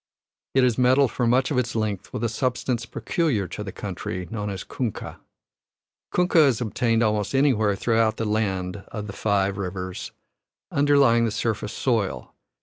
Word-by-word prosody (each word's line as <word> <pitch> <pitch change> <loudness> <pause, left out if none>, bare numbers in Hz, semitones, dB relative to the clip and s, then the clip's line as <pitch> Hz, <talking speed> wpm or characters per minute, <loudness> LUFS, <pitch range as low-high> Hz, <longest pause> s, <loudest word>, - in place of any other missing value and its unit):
It 130 - +5
is 125 -1 +2
metalled 130 +1 +4
for 120 - 0
much 125 +3 +2
of 130 - +2
its 120 -2 -2
length 110 -4 -2
with 110 - -4
a - - +3
substance 120 0 -1
peculiar 130 - -1
to - - -5
the - - -6
country, 90 -1 -5
known 105 -2 -3
as 95 -3 -5
kunkah. 120 -6 -5 0.9
Kunkah 175 -4 +4
is 125 -5 +1
obtained 115 0 +1
almost 105 +2 0
anywhere 115 -7 +3
throughout 110 +1 +1
the 115 - -2
Land 95 -4 -1
of 105 -3 -6
the 100 - -7
Five 100 -1 0
Rivers, 95 -1 -5 0.6
underlying 140 -5 +4
the - - +1
surface 110 0 -2
soil. 100 - -1
115 Hz, 160 wpm, -24 LUFS, 105-125 Hz, 0.9 s, It